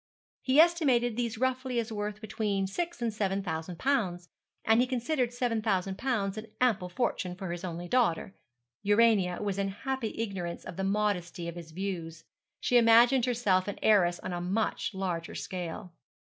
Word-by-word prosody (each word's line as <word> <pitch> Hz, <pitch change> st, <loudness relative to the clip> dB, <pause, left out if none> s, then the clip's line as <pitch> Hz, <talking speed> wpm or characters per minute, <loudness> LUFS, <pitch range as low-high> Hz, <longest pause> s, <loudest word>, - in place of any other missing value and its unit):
He 265 Hz, +3 st, +3 dB
estimated 275 Hz, -9 st, +4 dB
these 235 Hz, -2 st, -2 dB
roughly 255 Hz, 0 st, -1 dB
as 230 Hz, -1 st, -1 dB
worth 210 Hz, 0 st, -4 dB
between 210 Hz, -2 st, -1 dB
six 340 Hz, -, -3 dB
and 230 Hz, -2 st, 0 dB
seven 200 Hz, -2 st, -1 dB
thousand 165 Hz, 0 st, -4 dB
pounds, 185 Hz, -10 st, 0 dB, 0.4 s
and 225 Hz, +2 st, +5 dB
he 255 Hz, -, +2 dB
considered 250 Hz, 0 st, 0 dB
seven 245 Hz, -2 st, -1 dB
thousand 195 Hz, -2 st, -1 dB
pounds 215 Hz, -6 st, -1 dB
an 220 Hz, -, -9 dB
ample 220 Hz, -8 st, +2 dB
fortune 180 Hz, -3 st, -2 dB
for 185 Hz, -1 st, -5 dB
his 175 Hz, +1 st, -5 dB
only 175 Hz, -1 st, -5 dB
daughter. 195 Hz, -5 st, +1 dB, 0.5 s
Urania 205 Hz, -3 st, +3 dB
was 200 Hz, -1 st, -2 dB
in 195 Hz, -, +1 dB
happy 230 Hz, +4 st, -4 dB
ignorance 190 Hz, -6 st, -4 dB
of -, -, -7 dB
the 195 Hz, -, -3 dB
modesty 195 Hz, -4 st, -1 dB
of 170 Hz, -, -4 dB
his 170 Hz, -1 st, -9 dB
views. 165 Hz, -2 st, -5 dB, 0.4 s
She 245 Hz, -, +4 dB
imagined 235 Hz, +2 st, +6 dB
herself 210 Hz, -7 st, +1 dB
an 205 Hz, -, -4 dB
heiress 180 Hz, -5 st, +4 dB
on 185 Hz, -, -4 dB
a 175 Hz, -, -3 dB
much 195 Hz, +2 st, -1 dB
larger 180 Hz, -3 st, -3 dB
scale. 180 Hz, 0 st, -5 dB
205 Hz, 170 wpm, -29 LUFS, 180-240 Hz, 0.5 s, imagined